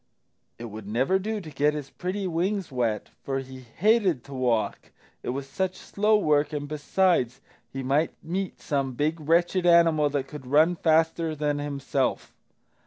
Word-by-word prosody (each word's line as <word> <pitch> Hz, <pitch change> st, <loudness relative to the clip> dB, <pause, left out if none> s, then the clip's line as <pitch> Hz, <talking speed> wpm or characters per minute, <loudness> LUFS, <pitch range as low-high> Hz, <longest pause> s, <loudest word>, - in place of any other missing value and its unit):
It 120 Hz, -, -7 dB
would 110 Hz, -2 st, -8 dB
never 130 Hz, -, +1 dB
do 215 Hz, +2 st, -3 dB
to 170 Hz, -6 st, -9 dB
get 150 Hz, +2 st, +1 dB
his 145 Hz, -2 st, -6 dB
pretty 190 Hz, +2 st, -3 dB
wings 185 Hz, +1 st, -1 dB
wet, 120 Hz, -4 st, -1 dB
for 135 Hz, -1 st, -2 dB
he 130 Hz, -1 st, -7 dB
hated 180 Hz, -, +1 dB
to 140 Hz, -, -11 dB
walk 120 Hz, -5 st, -1 dB, 0.3 s
it -, -, -5 dB
was 135 Hz, +2 st, -3 dB
such 185 Hz, +6 st, -2 dB
slow 210 Hz, +1 st, +2 dB
work 150 Hz, -5 st, +2 dB
and, 145 Hz, -1 st, -3 dB
besides, 150 Hz, -4 st, +1 dB, 0.3 s
he 135 Hz, 0 st, -5 dB
might 140 Hz, +5 st, +1 dB
meet 185 Hz, +3 st, -3 dB
some 140 Hz, -3 st, -1 dB
big 155 Hz, +6 st, -1 dB
wretched 170 Hz, +4 st, +2 dB
animal 165 Hz, -3 st, +5 dB
that 140 Hz, -2 st, -2 dB
could 145 Hz, -3 st, -9 dB
run 155 Hz, +6 st, +4 dB
faster 160 Hz, 0 st, +2 dB
than 145 Hz, -1 st, -1 dB
himself. 140 Hz, -2 st, -2 dB
150 Hz, 165 wpm, -26 LUFS, 135-175 Hz, 0.3 s, animal